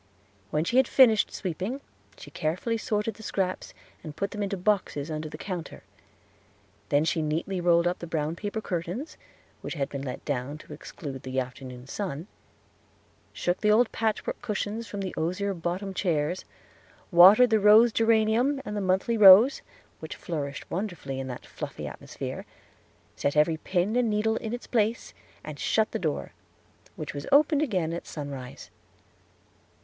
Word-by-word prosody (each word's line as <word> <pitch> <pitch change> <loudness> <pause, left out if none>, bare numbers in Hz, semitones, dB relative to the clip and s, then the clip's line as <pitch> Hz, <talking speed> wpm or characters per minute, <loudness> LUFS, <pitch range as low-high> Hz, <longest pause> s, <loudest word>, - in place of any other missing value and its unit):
When 150 +6 0
she 235 +9 0
had 265 - +5
finished 225 -5 +5
sweeping 190 - -4 0.4
she - - -12
carefully 175 +9 -1
sorted 220 -1 -1
the - - -12
scraps, 190 -3 -2 0.3
and 155 -2 -8
put 200 +3 -2
them 210 - -5
into 200 -1 -2
boxes 175 -6 0
under 155 0 -4
the - - -8
counter; 180 -4 -6 1.1
then 145 +2 +3
she 165 0 0
neatly 165 +5 -2
rolled 170 -1 +4
up 175 +1 0
the 170 - -7
brown 160 0 -2
paper 205 +4 -4
curtains, 180 - -4 0.5
which - - -5
had 140 -2 -2
been 140 -2 -5
let 130 -2 -6
down 140 +1 -3
to 155 - -12
exclude 140 -2 -8
the 130 0 -2
afternoon 125 0 -7
sun; 165 0 -4 1.1
shook 175 +1 -2
the 210 - +3
old 220 +3 +4
patchwork 220 -1 -2
cushions 215 -1 -3
in 200 - -4
the 190 -2 -4
osier 185 +5 -1
bottomed 185 +3 -4
chairs; 170 -1 -1 0.7
watered 195 +8 +8
the 220 - +4
rose 215 +3 +7
geranium 225 +5 +3
and 210 - -4
the 205 - -1
monthly 190 +5 +1
rose, 205 +6 +8 0.4
which - - -7
flourished 145 -6 -5
wonderfully 170 -8 -4
in 135 - -4
that 125 -2 -7
fluffy - - -7
atmosphere; - - -7 0.7
set 140 +1 -1
every 160 +2 +3
pin 185 +6 -1
and 245 -2 +2
needle 220 +1 +1
in 220 - -5
its 240 +1 -5
place, 225 -1 0 0.3
and 150 -2 -8
shut 220 -1 +1
the - - -2
door, 155 -4 -2 0.6
which - - -6
was 145 0 -6
opened 295 +1 +5
again 185 - 0
at 170 - -6
sunrise. 140 -4 -7
185 Hz, 160 wpm, -27 LUFS, 155-215 Hz, 1.1 s, watered